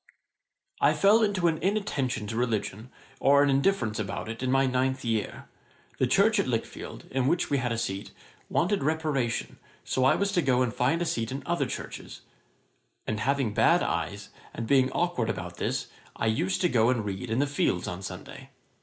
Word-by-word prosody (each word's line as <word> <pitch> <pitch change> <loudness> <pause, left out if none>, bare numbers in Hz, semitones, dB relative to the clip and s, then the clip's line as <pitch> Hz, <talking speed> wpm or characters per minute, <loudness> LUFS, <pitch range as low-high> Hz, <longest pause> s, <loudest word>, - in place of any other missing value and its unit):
'I - - +4
fell 210 +3 +5
into 200 -5 +2
an 160 -2 +1
inattention 165 - -1
to 110 +2 -5
religion, 115 -1 -2 0.3
or 140 +1 +5
an 145 - +3
indifference 135 - +1
about 105 +1 -4
it, 115 +1 -6
in 130 - -1
my 135 +1 +4
ninth 130 0 0
year. 115 -2 -2 0.5
The 130 - +3
church 205 - +4
at 200 - +1
Lichfield, 115 -3 -4
in 130 -1 +1
which 175 +2 +1
we 140 - +2
had 120 -1 -1
a 115 - -1
seat, 100 -2 -3 0.4
wanted 200 +4 +1
reparation, 150 -5 -1 0.2
so 130 - 0
I 130 - +5
was 200 0 0
to 180 -3 +2
go 130 -4 +2
and 120 -2 -2
find 140 +9 +1
a - - -2
seat 115 -7 -2
in 135 +2 -5
other 170 0 0
churches; - - -7 0.8
and 105 - -2
having 135 -2 0
bad - - +4
eyes, - - -3 0.3
and 115 - -4
being 130 +1 +3
awkward 170 -10 0
about - - -5
this, - - -1 0.3
I - - -2
used 160 +13 0
to 180 - +4
go 115 -6 +3
and 120 -4 0
read 100 +4 -4
in 115 - 0
the 140 - +3
fields 140 -10 0
on 90 +1 -5
Sunday. 95 - -8
130 Hz, 190 wpm, -27 LUFS, 115-160 Hz, 0.8 s, fell